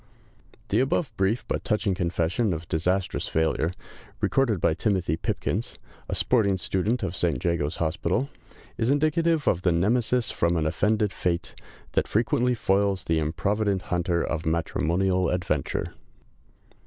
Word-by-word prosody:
The - - +2
above 135 +3 0
brief 95 +5 0
but - - -2
touching 105 -3 +1
confession 90 +3 0
of 80 +1 -7
disastrous 90 +4 0
failure, 80 +1 +1 0.5
recorded 120 -8 +2
by 80 - +2
Timothy 90 -4 0
Pipkins, - - -2 0.3
a - - -1
sporting 100 -6 +2
student 100 +7 -1
of 95 -1 -2
St. 85 -2 +1
Jago's 85 -3 0
Hospital, 85 - 0 0.5
is 115 +1 +1
indicative 155 +2 +2
of 85 - +2
the 90 - +2
Nemesis 115 +7 +1
from 85 0 +1
an 80 - 0
offended 105 +6 +1
fate, 85 -2 -2 0.4
that - - +1
frequently 120 +3 +1
foils 100 -2 +1
the 80 -1 +1
improvident 100 +5 0
hunter 85 -1 +1
of 80 0 -2
matrimonial 90 +2 +1
adventure. 85 -6 -1
95 Hz, 135 wpm, -26 LUFS, 85-110 Hz, 0.5 s, The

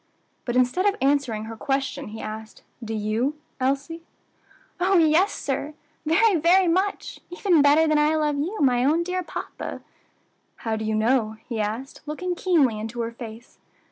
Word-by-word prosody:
But 240 - -2
instead 255 +10 +2
of 405 - +2
answering 270 -6 +1
her 225 +1 -7
question, 270 +3 -2
he 220 +1 -8
asked, 220 +1 -8 0.2
"Do 225 0 -4
you, 220 +7 -1 0.2
Elsie?" 275 +5 -1 0.8
"Oh! 375 +2 +3
yes, 330 +5 +4
sir; 285 +2 -3 0.3
very 385 +4 +4
very 350 +4 +4
much; 375 +4 -1
even 355 -2 +2
better 295 +3 +5
than 305 -1 +3
I 300 +1 +3
love 300 -2 0
you, 360 +9 -2
my 250 -3 +3
own 315 +5 +3
dear 365 +1 -2
papa." 355 - -6 0.7
"How 225 -1 -3
do 220 0 -4
you 215 0 0
know?" 220 0 +1
he 230 -3 -2
asked, 225 +6 -4
looking 355 +4 -3
keenly 305 - +2
into 225 +2 -4
her 230 0 -3
face. 230 0 -11
280 Hz, 165 wpm, -24 LUFS, 230-330 Hz, 0.8 s, better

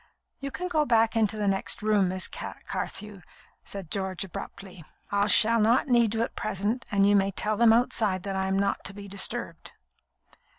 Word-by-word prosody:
"You 275 - -5
can 360 +6 -5
go 315 -4 +1
back 230 -4 +2
into 220 -1 +1
the 210 -1 -1
next 195 +2 -1
room, 210 -3 +2
Miss 185 0 -3
Carthew," 210 -3 -6 0.4
said 195 -5 -8
George, 190 -2 -1
abruptly. 185 -1 -9 0.3
"I 200 0 +2
shall 230 +2 +5
not 230 +5 +3
need 235 -3 +3
you 225 - +1
at - - -5
present, 215 +4 -2
and 200 -1 +3
you 205 - +4
may 195 -1 +3
tell 210 +2 -2
them 230 +1 +5
outside 220 -5 +1
that 195 -1 -4
I 190 0 -1
am 190 0 0
not 200 0 0
to 195 - -3
be 200 -1 -9
disturbed." 195 0 -2
205 Hz, 185 wpm, -27 LUFS, 195-225 Hz, 0.4 s, shall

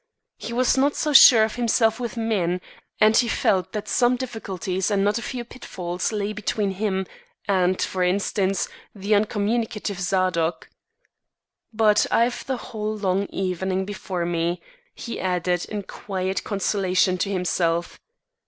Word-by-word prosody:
He - - -6
was 250 +2 +2
not 285 +2 +2
so 300 -1 -1
sure 235 -4 +9
of 220 +2 -2
himself 230 -1 +2
with 240 -1 -5
men; 195 -6 0 0.4
and 215 +1 +5
he 240 - +4
felt 190 -4 +1
that 210 -1 -4
some 245 +4 +3
difficulties 195 -7 -3
and 200 -2 +1
not 205 +3 +1
a - - -7
few 240 0 -5
pitfalls 180 -7 -4
lay 210 -1 -2
between 210 -1 -1
him 190 -1 -1 0.4
and, 185 -2 +2
for 185 - -2
instance, 195 +1 0 0.3
the 200 +1 -1
uncommunicative 210 -1 0
Zadok. 180 -3 0 1.0
"But 215 -2 +3
I've 240 +1 +1
the 265 -1 -1
whole 215 -2 -5
long 195 -1 0
evening 190 0 -2
before 190 -3 -4
me," 170 +1 -1 0.4
he 235 - -6
added 180 -1 0
in 205 -1 -5
quiet 190 -1 -4
consolation 190 -2 +1
to 195 - 0
himself. 175 -2 -1
200 Hz, 145 wpm, -23 LUFS, 185-220 Hz, 1.0 s, sure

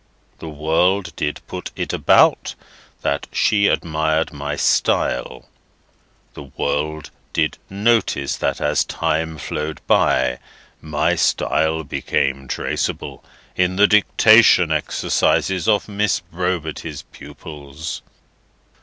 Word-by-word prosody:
The 80 - -7
world 85 +4 0
did 75 0 -3
put - - -7
it - - -4
about, - - +3 0.5
that 70 0 -1
she 100 -1 +2
admired 80 0 0
my 75 0 -4
style. 65 -2 0 0.9
The - - -10 0.2
world 75 +1 -2 0.2
did - - 0
notice 100 -8 +1
that - - -1
as - - +1
time 80 0 -2
flowed 75 +1 -4
by, 65 -1 +2 0.4
my 75 -1 0
style 80 0 +1
became 70 -1 -2
traceable - - -3 0.3
in 90 0 +1
the 100 +2 +5
dictation 105 -4 +5
exercises 80 +3 0
of 105 -2 +2
Miss 105 -1 0
Brobity's 85 -2 -4
pupils. 75 +2 -9
80 Hz, 100 wpm, -20 LUFS, 75-95 Hz, 0.9 s, the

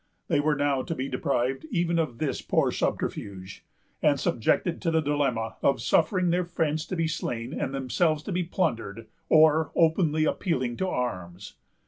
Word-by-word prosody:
They - - +3
were 150 +1 +2
now 140 -2 +1
to 165 - -4
be 130 -1 -3
deprived 135 0 -1
of - - -14
even 170 -7 0
this 150 0 -2
poor - - +1
subterfuge, 95 -1 -3 0.4
and 145 -2 +3
subjected 150 +10 0
to 170 - 0
the 160 0 +2
dilemma 140 -7 -1
of 140 - +2
suffering 185 -4 +2
their 180 +1 +1
friends 160 -3 -2
to - - -3
be 165 -2 0
slain 120 -5 -3
and 135 - -2
themselves 145 +4 0
to 200 - -5
be 180 0 0
plundered, 115 - -2 0.2
or 155 0 +5
openly 160 -2 +3
appealing 130 -10 -1
to 190 - -1
arms. 95 - -4
150 Hz, 165 wpm, -27 LUFS, 125-165 Hz, 0.4 s, or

